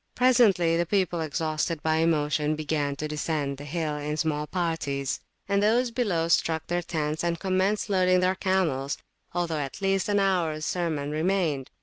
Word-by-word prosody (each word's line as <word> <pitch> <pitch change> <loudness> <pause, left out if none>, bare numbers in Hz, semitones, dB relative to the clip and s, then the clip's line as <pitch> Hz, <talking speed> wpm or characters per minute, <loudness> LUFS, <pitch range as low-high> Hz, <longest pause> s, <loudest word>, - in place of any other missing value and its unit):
Presently 210 -10 +4
the 170 - +1
people, 180 -3 +1
exhausted 155 +1 -2
by 160 0 +2
emotion, 155 -2 +1
began 150 -2 -1
to 155 +2 -4
descend 150 -2 -2
the 145 - -8
hill 155 -1 -2
in 150 +1 -3
small 150 -1 -1
parties; 150 -6 -2 0.3
and 200 0 +2
those 235 +4 +2
below 200 -9 0
struck 160 -1 +1
their 175 0 -1
tents 155 -2 -2
and 170 -1 -1
commenced 190 +2 +1
loading 185 -2 +3
their 185 +1 +2
camels, 175 -8 0 0.4
although 170 -3 -1
at 140 +3 -5
least 195 0 +1
an 205 0 +3
hours 170 -6 +1
sermon 155 -5 -1
remained. 155 -4 0
165 Hz, 160 wpm, -27 LUFS, 150-185 Hz, 0.4 s, Presently